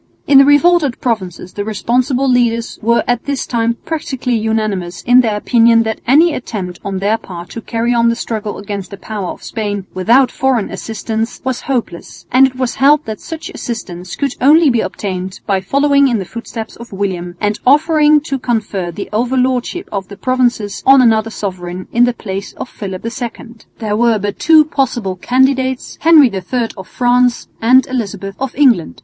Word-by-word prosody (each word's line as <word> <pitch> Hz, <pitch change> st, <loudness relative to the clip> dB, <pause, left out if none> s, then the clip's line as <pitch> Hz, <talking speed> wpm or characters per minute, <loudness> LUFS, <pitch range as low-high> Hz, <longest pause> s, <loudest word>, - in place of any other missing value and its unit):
In 275 Hz, -1 st, +6 dB
the 275 Hz, -, +7 dB
revolted 290 Hz, -1 st, +3 dB
provinces 185 Hz, -6 st, -3 dB
the 205 Hz, -, -3 dB
responsible 245 Hz, +6 st, 0 dB
leaders 235 Hz, -2 st, +1 dB
were 235 Hz, +2 st, +2 dB
at 245 Hz, -1 st, 0 dB
this 280 Hz, -2 st, -2 dB
time 235 Hz, -1 st, 0 dB
practically 265 Hz, -6 st, -2 dB
unanimous 215 Hz, -5 st, -2 dB
in 245 Hz, +1 st, +6 dB
their 220 Hz, -4 st, -1 dB
opinion 230 Hz, +1 st, +4 dB
that 220 Hz, -1 st, -4 dB
any 310 Hz, +6 st, +5 dB
attempt 190 Hz, -9 st, -5 dB
on 195 Hz, -1 st, -3 dB
their 205 Hz, +4 st, 0 dB
part 175 Hz, -1 st, -9 dB
to 230 Hz, -, -7 dB
carry 230 Hz, +1 st, -1 dB
on 235 Hz, 0 st, +3 dB
the 230 Hz, -, +1 dB
struggle 215 Hz, -3 st, -4 dB
against 200 Hz, -1 st, -6 dB
the 200 Hz, -, -9 dB
power 205 Hz, -2 st, -5 dB
of -, -, -8 dB
Spain 205 Hz, -3 st, -4 dB
without 235 Hz, +8 st, +3 dB
foreign 260 Hz, -5 st, 0 dB
assistance 225 Hz, +1 st, -4 dB
was 260 Hz, -1 st, -2 dB
hopeless; 235 Hz, -10 st, -4 dB
and 265 Hz, +2 st, +6 dB
it 255 Hz, -, -10 dB
was 255 Hz, -2 st, -2 dB
held 290 Hz, +3 st, +3 dB
that 220 Hz, -1 st, -5 dB
such 325 Hz, -1 st, -7 dB
assistance 180 Hz, -6 st, -6 dB
could 280 Hz, -1 st, -2 dB
only 300 Hz, +2 st, +5 dB
be 235 Hz, -2 st, +1 dB
obtained 185 Hz, -2 st, -5 dB
by 195 Hz, -2 st, 0 dB
following 280 Hz, +6 st, +3 dB
in 240 Hz, -3 st, +1 dB
the 195 Hz, -, -4 dB
footsteps 230 Hz, +1 st, -7 dB
of 235 Hz, 0 st, -11 dB
William 185 Hz, -3 st, -3 dB
and 210 Hz, +1 st, -1 dB
offering 300 Hz, +2 st, +4 dB
to 275 Hz, -2 st, -4 dB
confer 215 Hz, -7 st, -2 dB
the 175 Hz, +4 st, -6 dB
overlordship 255 Hz, -, 0 dB
of 195 Hz, -2 st, -4 dB
the 200 Hz, -, -11 dB
provinces 245 Hz, -5 st, 0 dB
on 270 Hz, 0 st, +6 dB
another 225 Hz, -2 st, +3 dB
sovereign 185 Hz, -4 st, -6 dB
in 240 Hz, +1 st, +4 dB
the 245 Hz, -, +1 dB
place 195 Hz, -3 st, -6 dB
of -, -, -7 dB
Philip 190 Hz, -4 st, -7 dB
II. 235 Hz, 0 st, -6 dB, 0.2 s
There 215 Hz, -2 st, -2 dB
were 230 Hz, 0 st, +3 dB
but 205 Hz, 0 st, -4 dB
two 310 Hz, -1 st, +5 dB
possible 240 Hz, -10 st, -1 dB
candidates, 260 Hz, +4 st, 0 dB
Henry 305 Hz, -5 st, +6 dB
III 225 Hz, +5 st, -2 dB
of 190 Hz, -2 st, -10 dB
France 245 Hz, 0 st, +1 dB
and 255 Hz, +3 st, +5 dB
Elizabeth 200 Hz, -6 st, -4 dB
of 270 Hz, -1 st, -4 dB
England. 240 Hz, -, +2 dB
235 Hz, 180 wpm, -15 LUFS, 205-260 Hz, 0.2 s, the